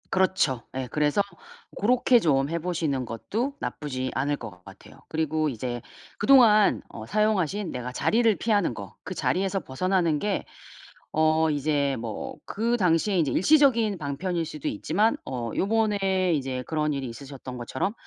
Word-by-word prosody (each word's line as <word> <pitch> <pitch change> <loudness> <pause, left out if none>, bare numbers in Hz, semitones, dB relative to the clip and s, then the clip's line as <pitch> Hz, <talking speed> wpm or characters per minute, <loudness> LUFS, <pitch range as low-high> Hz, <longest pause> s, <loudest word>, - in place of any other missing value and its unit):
그렇죠. 185 -9 +2
예. 130 -1 -3
그래서 150 +5 +2 0.5
고렇게 245 +3 +4
좀 140 -7 +2
해 170 - -1
보시는 160 -6 -1
것도 215 - -3
나쁘지 130 -3 -4
않을 140 +3 0
것 105 -9 -10
같아요. 95 0 -14
그리고 155 -1 0
이제 120 -2 -4 0.4
그동안 225 -6 +5
어 110 - -8
사용하신 205 - 0
내가 125 0 -5
자리를 225 - +3
피하는 205 - +1
거 100 -4 -8
그 - - -5
자리에서 195 +1 0
벗어나는 170 +2 0
게 205 +3 -1 0.7
어 155 0 +3
이제 145 -2 0
뭐 115 -2 -5
그 230 +3 0
당시에 185 0 +2
이제 155 -6 +2
일시적인 235 - +4
방편일 165 +3 -2
수도 150 -2 -6
있지만 195 - +1
어 120 -3 -4
요번에 195 -4 +1
이제 130 -3 -3
그런 155 -1 0
일이 135 -2 -3
있으셨던 130 +1 -9
것처럼 130 - -2
160 Hz, 320 characters per minute, -26 LUFS, 135-200 Hz, 0.7 s, 그동안